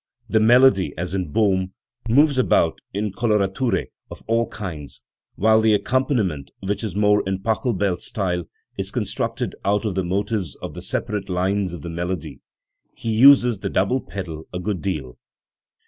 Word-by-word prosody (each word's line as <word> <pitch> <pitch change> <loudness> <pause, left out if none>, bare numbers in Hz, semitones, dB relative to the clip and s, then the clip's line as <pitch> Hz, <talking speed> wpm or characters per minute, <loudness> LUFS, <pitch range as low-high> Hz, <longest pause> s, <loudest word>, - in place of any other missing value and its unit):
The 110 - +2
melody, 110 - +5
as 90 +2 -4
in 90 -6 -2
Bohm, 95 -1 +1 0.4
moves 140 +2 +4
about 85 -9 +2
in 105 +1 -2
color 110 0 +1
ature 115 +6 -1 0.2
of - - -11
all 115 +1 +1
kinds, 80 -9 -7 0.3
while 110 +2 +4
the 110 -1 +4
accompaniment, 110 - 0
which 100 +3 -3
is 105 -5 -4
more 105 0 +3
in 95 0 0
PachelbeFs 105 -5 0
style, 90 -4 -2 0.3
is - - -2
constructed - - -2
out 105 +2 +1
of 105 - -1
the 95 +1 -1
motives 95 - -2
of - - -8
the - - -8
separate 105 -2 -3
lines 95 +1 0
of 85 -4 -8
the 85 - -5
melody. 85 -3 -4 0.6
He 115 - -3
uses 125 -1 +6
the 100 - -3
double 110 +9 +1
pedal 80 -5 -7
a 90 - -4
good 90 0 -3
deal. 75 -10 -4
100 Hz, 165 wpm, -22 LUFS, 90-110 Hz, 0.6 s, uses